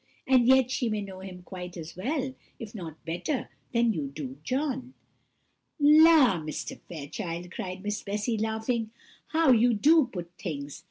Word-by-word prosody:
and 255 Hz, -2 st, +4 dB
yet 260 Hz, -1 st, +5 dB
she 245 Hz, -2 st, 0 dB
may 215 Hz, -1 st, -1 dB
know 195 Hz, -2 st, -7 dB
him 185 Hz, -1 st, -9 dB
quite 180 Hz, -1 st, -8 dB
as 165 Hz, 0 st, -8 dB
well, 265 Hz, -, -2 dB, 0.2 s
if 220 Hz, -2 st, -8 dB
not 165 Hz, -7 st, -8 dB
better, 175 Hz, -, -2 dB, 0.2 s
than 235 Hz, -1 st, +3 dB
you 150 Hz, -6 st, -3 dB
do 140 Hz, -1 st, -7 dB
John." 260 Hz, -, -2 dB, 0.8 s
"La! 300 Hz, -, +7 dB
Mr. 155 Hz, -1 st, -5 dB
Fairchild," 170 Hz, +2 st, -5 dB
cried 185 Hz, 0 st, -6 dB
Miss 210 Hz, 0 st, -2 dB
Bessy, 210 Hz, +3 st, -2 dB
laughing, 220 Hz, +1 st, -1 dB, 0.4 s
"how 320 Hz, -3 st, +3 dB
you 240 Hz, 0 st, +5 dB
do 295 Hz, +4 st, +5 dB
put 175 Hz, -2 st, -6 dB
things! 145 Hz, -5 st, -5 dB
210 Hz, 155 wpm, -28 LUFS, 175-255 Hz, 0.8 s, La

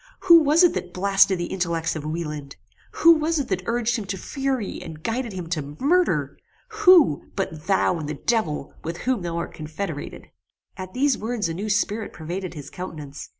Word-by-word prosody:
Who 340 Hz, -3 st, +8 dB
was 305 Hz, +4 st, +4 dB
it 355 Hz, -, +5 dB
that 180 Hz, 0 st, -5 dB
blasted 195 Hz, 0 st, +4 dB
the 175 Hz, -, -2 dB
intellects 170 Hz, -3 st, -1 dB
of 155 Hz, -, -5 dB
Wieland? 150 Hz, -3 st, -5 dB, 0.4 s
Who 335 Hz, -, +6 dB
was 320 Hz, +1 st, 0 dB
it 280 Hz, -4 st, -2 dB
that 190 Hz, -2 st, 0 dB
urged 240 Hz, +1 st, +1 dB
him 215 Hz, -, -5 dB
to 190 Hz, 0 st, -4 dB
fury, 265 Hz, -1 st, -3 dB
and 155 Hz, -1 st, -9 dB
guided 235 Hz, +1 st, -2 dB
him 185 Hz, -3 st, -5 dB
to 150 Hz, -3 st, -4 dB
murder? 355 Hz, +6 st, +1 dB, 0.3 s
Who, 370 Hz, -, +5 dB
but 165 Hz, -6 st, -4 dB
thou 190 Hz, -3 st, +2 dB
and 150 Hz, -2 st, -5 dB
the 150 Hz, -, -3 dB
devil, 165 Hz, -7 st, -1 dB
with 165 Hz, +2 st, -4 dB
whom 255 Hz, -5 st, +1 dB
thou 170 Hz, -1 st, -3 dB
art 170 Hz, -, -4 dB
confederated?" 155 Hz, +6 st, -6 dB, 0.4 s
At 185 Hz, +1 st, -8 dB
these 275 Hz, 0 st, +2 dB
words 220 Hz, -5 st, -2 dB
a -, -, -3 dB
new 200 Hz, +6 st, -4 dB
spirit 210 Hz, +1 st, -1 dB
pervaded 175 Hz, +2 st, -5 dB
his 145 Hz, -1 st, -9 dB
countenance. 150 Hz, -6 st, -8 dB
190 Hz, 190 wpm, -24 LUFS, 165-245 Hz, 0.4 s, Who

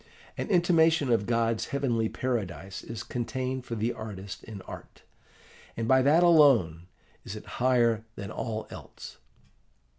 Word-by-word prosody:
An -, -, -4 dB
intimation 165 Hz, -6 st, +3 dB
of 110 Hz, -3 st, +2 dB
God's 115 Hz, -1 st, 0 dB
heavenly 120 Hz, -6 st, 0 dB
paradise 100 Hz, -6 st, -4 dB
is 115 Hz, 0 st, -6 dB
contained 130 Hz, +2 st, -3 dB
for 115 Hz, -, -4 dB
the 115 Hz, +2 st, -1 dB
artist 100 Hz, -3 st, -8 dB
in 105 Hz, -4 st, -9 dB
art, -, -, -11 dB, 0.7 s
and 115 Hz, 0 st, -2 dB
by 130 Hz, +2 st, +5 dB
that 150 Hz, +6 st, +4 dB
alone 125 Hz, -, +5 dB, 0.4 s
is 100 Hz, -, -7 dB
it 105 Hz, -, -9 dB, 0.2 s
higher 120 Hz, -3 st, +3 dB
than 100 Hz, +1 st, -7 dB
all 110 Hz, -2 st, -4 dB
else. -, -, -10 dB
115 Hz, 140 wpm, -28 LUFS, 110-130 Hz, 0.7 s, by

